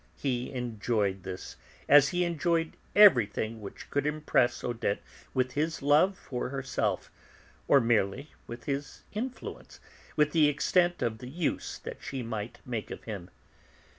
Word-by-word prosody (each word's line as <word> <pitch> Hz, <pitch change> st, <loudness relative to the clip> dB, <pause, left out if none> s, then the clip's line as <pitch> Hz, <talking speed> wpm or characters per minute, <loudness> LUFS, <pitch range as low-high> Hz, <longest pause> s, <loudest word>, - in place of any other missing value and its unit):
He 125 Hz, -2 st, -2 dB
enjoyed 110 Hz, -5 st, -1 dB
this, 95 Hz, 0 st, -7 dB, 0.3 s
as 145 Hz, -1 st, +7 dB
he 180 Hz, 0 st, +1 dB
enjoyed 165 Hz, 0 st, 0 dB, 0.2 s
everything 115 Hz, -, +5 dB
which 100 Hz, -, -9 dB
could 145 Hz, +1 st, +1 dB
impress 150 Hz, -5 st, +1 dB
Odette 115 Hz, -4 st, -1 dB, 0.4 s
with 130 Hz, -1 st, +1 dB
his 155 Hz, +2 st, -1 dB
love 155 Hz, +7 st, +4 dB
for 125 Hz, -8 st, -4 dB
herself, 135 Hz, 0 st, -2 dB, 0.6 s
or 140 Hz, -, +7 dB
merely 115 Hz, +3 st, +1 dB, 0.2 s
with 120 Hz, 0 st, -8 dB
his 140 Hz, 0 st, -4 dB
influence, 245 Hz, +5 st, -6 dB, 0.4 s
with 150 Hz, 0 st, +3 dB
the 155 Hz, -2 st, +5 dB
extent 175 Hz, +4 st, +2 dB
of 110 Hz, -1 st, -1 dB
the 125 Hz, -, -8 dB
use 160 Hz, +2 st, -2 dB
that -, -, -8 dB
she 135 Hz, -2 st, -4 dB
might 110 Hz, -1 st, -5 dB
make 115 Hz, -4 st, -4 dB
of -, -, -7 dB
him. 100 Hz, -5 st, -6 dB
130 Hz, 140 wpm, -29 LUFS, 115-150 Hz, 0.6 s, as